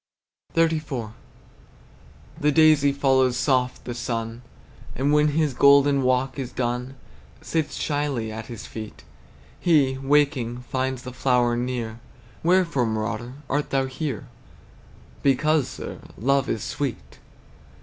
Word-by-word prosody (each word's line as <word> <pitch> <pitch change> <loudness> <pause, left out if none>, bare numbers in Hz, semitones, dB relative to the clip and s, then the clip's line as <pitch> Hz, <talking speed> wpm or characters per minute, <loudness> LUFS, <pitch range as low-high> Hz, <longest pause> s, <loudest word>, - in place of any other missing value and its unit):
XXXIV. 155 -9 0 1.3
The 150 +1 +3
daisy 155 -2 +5
follows 130 -2 +2
soft 125 -1 0
the 120 - -4
sun, 115 -1 -4 0.5
And 140 +3 +1
when 150 0 +4
his 150 -1 +1
golden 140 +1 +5
walk 130 +1 +1
is 130 -2 -4
done, 125 +1 -3 0.5
Sits 160 -2 -1
shyly 145 -7 -2
at 110 +1 -7
his 115 -3 -8
feet. 110 -1 -8 0.6
He, 140 -6 +3
waking, 135 -4 +1
finds 130 0 -2
the 125 - -7
flower 125 -2 +2
near. 120 -2 -3 0.4
"Wherefore, 165 -8 +2
marauder, 110 +2 -3
art 145 +1 -1
thou 135 -1 +1
here?" 130 -2 -4 0.9
"Because, 145 +1 +2
sir, - - -7 0.2
love 135 +4 +1
is 115 - -2
sweet!" 140 -5 -4
130 Hz, 120 wpm, -24 LUFS, 120-145 Hz, 1.3 s, daisy